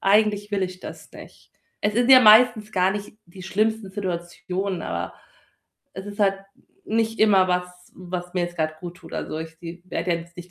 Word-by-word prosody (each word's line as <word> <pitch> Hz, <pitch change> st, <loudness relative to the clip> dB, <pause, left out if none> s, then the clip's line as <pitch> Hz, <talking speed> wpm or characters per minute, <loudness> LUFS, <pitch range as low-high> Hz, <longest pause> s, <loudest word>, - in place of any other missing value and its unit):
„Eigentlich 205 Hz, 0 st, +2 dB
will 200 Hz, -2 st, 0 dB
ich 185 Hz, 0 st, -4 dB
das -, -, -10 dB
nicht.“ -, -, -14 dB, 0.3 s
Es 205 Hz, +1 st, +1 dB
sind 240 Hz, +3 st, +2 dB
ja 255 Hz, -1 st, +10 dB
meistens 215 Hz, -1 st, +6 dB
gar 185 Hz, 0 st, +3 dB
nicht 205 Hz, +1 st, -6 dB
die 185 Hz, +2 st, -12 dB
schlimmsten 215 Hz, +1 st, -1 dB
Situationen, 180 Hz, 0 st, -4 dB
aber -, -, -4 dB, 0.8 s
es 190 Hz, +1 st, -8 dB
ist 205 Hz, 0 st, -8 dB
halt 195 Hz, -1 st, +3 dB, 0.5 s
nicht 225 Hz, 0 st, 0 dB
immer 195 Hz, -4 st, +5 dB
was 180 Hz, 0 st, -1 dB, 0.2 s
was 180 Hz, 0 st, -6 dB
mir 180 Hz, -, +1 dB
jetzt 175 Hz, 0 st, -4 dB
grad 155 Hz, -1 st, -2 dB
guttut. 175 Hz, 0 st, -10 dB
Also, 155 Hz, -, -4 dB
ich 160 Hz, 0 st, -7 dB
se 170 Hz, +1 st, -9 dB
werde 180 Hz, -1 st, -2 dB
ja 170 Hz, -, +1 dB
jetzt 170 Hz, 0 st, -13 dB
nicht 175 Hz, 0 st, -10 dB
190 Hz, 190 wpm, -24 LUFS, 175-210 Hz, 0.8 s, ja